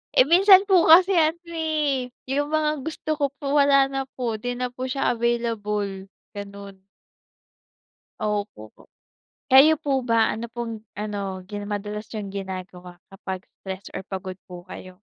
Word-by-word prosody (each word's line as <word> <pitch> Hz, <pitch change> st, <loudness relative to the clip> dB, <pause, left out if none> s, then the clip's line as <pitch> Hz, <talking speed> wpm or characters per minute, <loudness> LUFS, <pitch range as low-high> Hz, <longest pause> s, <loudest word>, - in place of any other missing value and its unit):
eh, 255 Hz, -, +7 dB
minsan 380 Hz, +3 st, +7 dB
po 370 Hz, -3 st, +5 dB
kasi 365 Hz, +4 st, +8 dB
ano, 325 Hz, +1 st, +3 dB
eh, 300 Hz, -5 st, -1 dB, 0.2 s
yung 290 Hz, +2 st, 0 dB
mga 305 Hz, -2 st, 0 dB
gusto 310 Hz, 0 st, -6 dB
ko 285 Hz, -, +3 dB
po, 280 Hz, 0 st, -2 dB
wala 275 Hz, -1 st, +5 dB
na 270 Hz, 0 st, -2 dB
po, 235 Hz, -3 st, -1 dB
'di 245 Hz, +2 st, -3 dB
na 250 Hz, 0 st, -2 dB
po 255 Hz, +1 st, -4 dB
siya 270 Hz, 0 st, 0 dB
available, 210 Hz, -5 st, -2 dB, 0.3 s
ganon. 200 Hz, -1 st, -9 dB, 1.4 s
Opo, 205 Hz, -, -3 dB, 0.8 s
kayo 300 Hz, +4 st, +8 dB
po 275 Hz, -2 st, -1 dB
ba, 230 Hz, -2 st, +2 dB
ano 230 Hz, +2 st, -5 dB
pong 230 Hz, -2 st, -6 dB, 0.2 s
ano 200 Hz, -3 st, -4 dB
gina 205 Hz, +1 st, -7 dB
madalas 210 Hz, +1 st, -5 dB
yung 200 Hz, -2 st, -5 dB
ginagawa 185 Hz, -2 st, -7 dB, 0.2 s
kapag 190 Hz, -1 st, -6 dB, 0.2 s
stress 190 Hz, 0 st, -7 dB
or -, -, -4 dB
pagod 190 Hz, -1 st, -6 dB
po 175 Hz, -1 st, -10 dB
kayo? 185 Hz, 0 st, -11 dB
225 Hz, 145 wpm, -24 LUFS, 195-280 Hz, 1.4 s, kasi